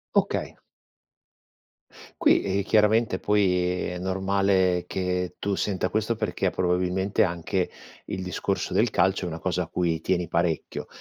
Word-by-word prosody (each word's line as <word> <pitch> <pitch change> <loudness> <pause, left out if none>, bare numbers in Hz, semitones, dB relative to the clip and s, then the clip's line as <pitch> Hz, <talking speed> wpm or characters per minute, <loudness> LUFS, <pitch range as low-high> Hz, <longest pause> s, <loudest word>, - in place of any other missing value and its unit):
Okay. - - 0 1.6
Qui, - - +5
ehm, 100 0 0
chiaramente 105 -1 +3
poi 90 -3 +1
è 90 0 -5
normale 95 -1 +1
che 90 -1 -2
tu 100 - -2
senta 95 -1 -1
questo 110 +2 0
perché, - - -1
probabilmente, 90 +2 +1
anche 90 +1 -1 0.4
il 95 - -4
discorso 90 - -2
del - - +3
calcio 95 0 +1
è - - -2
una 80 -1 -4
cosa 90 +1 -1
a - - -9
cui 85 -2 -1
tieni 90 0 0
parecchio. 85 -1 -1
95 Hz, 135 wpm, -26 LUFS, 90-100 Hz, 1.6 s, Qui